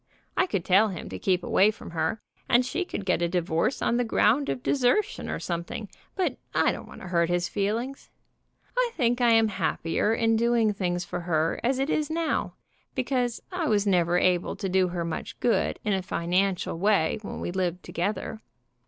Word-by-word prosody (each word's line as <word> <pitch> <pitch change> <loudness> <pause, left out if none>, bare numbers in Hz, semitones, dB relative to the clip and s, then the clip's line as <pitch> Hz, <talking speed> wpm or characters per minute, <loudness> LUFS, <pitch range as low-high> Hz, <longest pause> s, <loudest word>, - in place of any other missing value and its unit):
I 370 - +2
could 185 - -2
tell 195 +4 +5
him 185 -5 -6
to 95 - -6
keep 185 - +1
away 200 - +4
from 215 - -7
her, 165 +5 -2 0.3
and 245 +1 +4
she 335 +8 -2
could 200 - -5
get 180 -2 +1
a 170 - +2
divorce 170 +5 0
on 235 - +2
the 245 - +2
ground 240 +4 +2
of 250 - -3
desertion 285 - +1
or - - -2
something, 175 +4 -4 0.3
but 375 -2 0 0.2
I - - +4
don't - - -7
want - - -12
to 185 - -8
hurt 170 -1 +2
his 175 0 +1
feelings. 230 +7 -2 0.7
I - - +2
think 245 -3 +1
I 235 -1 +5
am 225 -1 +4
happier 170 +1 0
in 225 0 +2
doing 230 -2 +2
things 175 -3 -2
for 180 - -4
her 165 -2 0
as 255 +2 +2
it 270 +3 0
is 305 0 0
now, 325 0 -1 0.4
because 250 -2 -1
I 355 -3 -1
was 205 -2 +2
never 175 -3 +3
able 180 -1 +2
to 195 - -3
do 185 0 +3
her 175 -1 -3
much 165 - -5
good 240 - +1
in 210 - +1
a 190 - 0
financial 180 0 0
way 200 -2 +2
when 205 - -6
we - - -3
lived 180 -1 -2
together. 210 +4 -3
205 Hz, 195 wpm, -27 LUFS, 175-240 Hz, 0.7 s, tell